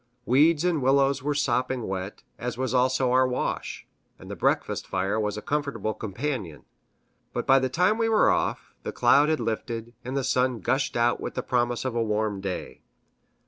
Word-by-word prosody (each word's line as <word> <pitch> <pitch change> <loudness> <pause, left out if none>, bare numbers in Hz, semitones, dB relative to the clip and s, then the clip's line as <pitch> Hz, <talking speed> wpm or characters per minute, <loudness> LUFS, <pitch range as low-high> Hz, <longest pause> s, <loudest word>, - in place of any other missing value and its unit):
Weeds 150 +6 +4
and 170 -5 +1
willows 135 +1 +3
were 145 +2 -1
sopping 125 -3 0
wet, 95 +1 -5 0.2
as 120 -1 -4
was 130 -1 -2
also 130 0 +2
our 130 0 +4
wash, 125 - -3 0.3
and - - -11
the - - -4
breakfast - - 0
fire 95 +3 -1
was 105 -1 -2
a 105 - -6
comfortable 140 -8 -2
companion. 110 - -5 0.7
But - - -2
by 135 0 +6
the 130 0 -1
time 180 - +2
we 225 0 +2
were 220 - +4
off, - - -2
the - - -5
cloud 145 +2 +4
had 155 - +1
lifted, 115 0 -4
and 130 +2 -4
the 135 - 0
sun 125 -1 +1
gushed 130 +6 0
out 120 +1 +2
with - - -5
promise 120 0 0
of 130 - -1
a 120 - 0
warm 105 -2 -1
day. 95 -2 -5
125 Hz, 185 wpm, -26 LUFS, 110-140 Hz, 0.7 s, by